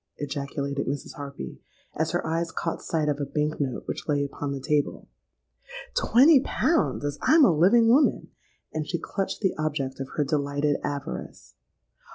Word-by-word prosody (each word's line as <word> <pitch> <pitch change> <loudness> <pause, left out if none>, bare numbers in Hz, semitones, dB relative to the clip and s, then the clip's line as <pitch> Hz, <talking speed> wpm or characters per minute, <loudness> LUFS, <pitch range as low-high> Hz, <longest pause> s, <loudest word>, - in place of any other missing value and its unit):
ejaculated 140 0 -3
Mrs. 140 0 -4
Harpy, 140 - -8 0.3
as 160 +1 -1
her 175 +2 -1
eyes 165 +1 -1
caught 165 - -3
sight 155 -2 -1
of 145 -1 0
a - - -1
bank 150 +2 -2
note 130 -3 -2
which - - -5
lay 145 -2 +1
upon 140 0 -4
the 140 - -3
table. 145 +2 -1 0.9
'Twenty 275 +5 +6
pounds, 310 - 0
as 145 0 -3
I'm 315 -2 +6
a 175 - +4
living 205 +9 +5
woman!' 270 +6 +3 0.4
and 155 -1 -3
she 170 - -1
clutched 195 +4 -4
the 190 -3 +2
object 145 -4 -2
of 135 - -5
her 150 - +2
delighted 145 0 0
avarice. 140 -1 -5
150 Hz, 165 wpm, -26 LUFS, 140-170 Hz, 0.9 s, Twenty